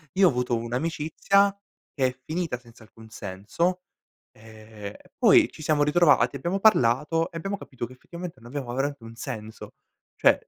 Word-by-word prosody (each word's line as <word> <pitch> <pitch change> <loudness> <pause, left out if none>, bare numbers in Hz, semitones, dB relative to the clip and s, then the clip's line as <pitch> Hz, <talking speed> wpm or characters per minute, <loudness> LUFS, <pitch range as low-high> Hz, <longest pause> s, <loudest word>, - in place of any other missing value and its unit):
Io 190 0 +6
ho - - +6
avuto 125 -3 0
un'amicizia 160 +10 +1 0.4
che 135 - +2
è 125 - -5
finita 160 -6 -2
senza 120 -2 -17
alcun 110 0 -16
senso, 105 - -2 0.5
ehm, 110 -2 -10
e - - -24
poi - - +6
ci - - -12
siamo 150 -1 +2
ritrovati, 145 -5 +4
abbiamo 170 +8 -2
parlato 165 - +3
e 165 - -6
abbiamo 195 +4 -3
capito 130 -8 -6
che 130 - -13
effettivamente 170 +3 -9
non 120 +1 -12
aveva 130 -4 -4
veramente 140 -1 -2
un 115 0 -10
senso, 110 -3 -7 0.4
cioè - - +5
135 Hz, 165 wpm, -26 LUFS, 115-165 Hz, 0.5 s, Io